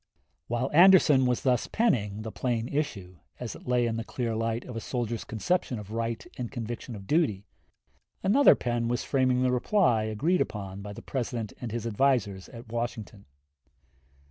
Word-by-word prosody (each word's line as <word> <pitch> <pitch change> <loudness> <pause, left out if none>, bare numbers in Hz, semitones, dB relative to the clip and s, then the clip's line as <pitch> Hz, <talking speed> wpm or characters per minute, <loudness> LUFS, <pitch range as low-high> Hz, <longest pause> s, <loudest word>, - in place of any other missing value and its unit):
While 120 +3 -1
Anderson 160 -6 +7
was 125 -1 0
thus 125 -3 +2
penning 110 - 0
the 110 - -5
plain 120 -1 -1
issue, 100 - -3 0.2
as 125 -2 -5
it - - -13
lay 125 -1 +2
in 115 -1 -1
the 115 - -3
clear 115 0 -3
light 115 +1 -1
of 125 - -8
a - - -2
soldier's 120 -1 -3
conception 125 - -1
of 105 -1 -9
right 115 -1 -3
and 120 -2 -4
conviction 120 -1 -5
of 100 -2 -9
duty, 120 - +1 0.8
another 255 +9 +6
pen 120 -1 -1
was 120 +1 -1
framing 130 -2 +2
the 130 - +2
reply 125 - +2
agreed 150 - +1
upon 100 -2 -4
by 100 0 -7
the - - -10
President 120 -4 -3
and 120 -3 -4
his 115 0 -4
advisers 110 -5 +1
at 115 -1 -11
Washington. 115 -3 -4
120 Hz, 170 wpm, -28 LUFS, 110-130 Hz, 0.8 s, Anderson